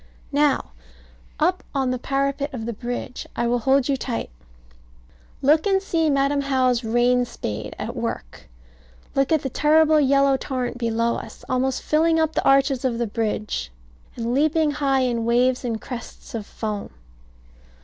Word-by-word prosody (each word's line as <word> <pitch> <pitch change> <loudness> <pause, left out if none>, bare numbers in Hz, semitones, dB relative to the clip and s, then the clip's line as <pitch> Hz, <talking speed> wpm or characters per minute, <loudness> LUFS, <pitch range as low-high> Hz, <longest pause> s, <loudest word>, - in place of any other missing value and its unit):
Now, 290 - +2 0.7
up 360 +4 +1
on 265 -2 +1
the 255 - -2
parapet 275 +2 -1
of 225 -3 -5
the 235 - -3
bridge. 245 +2 -5
I - - 0
will 240 +1 +1
hold 265 +2 +3
you 280 - +2
tight. 245 - -4 1.1
Look 305 +7 +4
and 390 -1 +3
see 330 -5 0
Madam 280 0 +2
How's 255 -3 +1
rain 240 +2 +3
spade 105 - -5
at - - -5
work. - - -5 0.6
Look 275 +2 +1
at 315 -3 +3
the 270 - -2
terrible 310 +2 +4
yellow 275 -1 +4
torrent 250 -2 -3
below 230 0 0
us, 225 - -10
almost 255 +1 0
filling 325 +1 +3
up 320 0 +1
the - - 0
arches 275 -1 +3
of 250 -3 0
the 240 - 0
bridge, 210 - -2 0.5
and 235 0 -2
leaping 310 +2 +2
high 275 -2 +1
in 240 -2 0
waves 245 +2 +2
and 230 -3 -2
crests 240 +1 -9
of 220 -3 -5
foam. 210 -2 -4
260 Hz, 160 wpm, -23 LUFS, 235-285 Hz, 1.1 s, Look